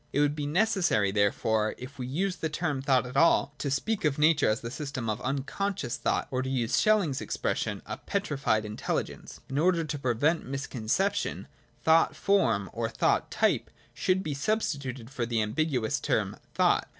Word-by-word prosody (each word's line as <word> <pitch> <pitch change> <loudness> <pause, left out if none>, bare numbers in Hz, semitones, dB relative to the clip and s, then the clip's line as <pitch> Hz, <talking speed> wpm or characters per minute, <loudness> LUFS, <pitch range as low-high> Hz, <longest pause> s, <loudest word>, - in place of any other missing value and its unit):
It - - 0
would 145 0 +2
be 145 -1 -3
necessary, 170 - +2
therefore, 105 +2 +1
if 130 +2 -10
we 125 - -3
use 180 +8 -1
the 160 - -2
term 145 -2 -2
thought 130 -2 +2
at 125 - -8
all, 165 -4 +4
to 140 - -2
speak 195 +11 -1
of 150 -3 +1
nature 150 0 +4
as 110 +4 0
the 115 - -5
system 135 -4 -4
of 110 +2 -2
unconscious 140 +4 -2
thought, - - -1
or, 130 -1 0
to 130 - -3
use 120 -3 0
SchelUng's 200 -11 +2
expression, - - -2
a - - -5
petrified 140 - -1
intelligence. 105 0 -4
And 135 +1 -2
in - - +2
order 175 -2 +3
to 150 -2 -4
prevent 140 +6 +1
misconception, 140 - -2 0.4
thought 160 +1 +4
form 115 - +2
or - - -2
thought - - +1
type - - +1 0.2
should 190 0 +1
be 150 - -2
substituted 140 - -2
for 120 -4 -2
the 115 -1 0
ambiguous 120 +2 0
term - - 0 0.2
thought. - - +3
140 Hz, 175 wpm, -28 LUFS, 120-165 Hz, 0.4 s, all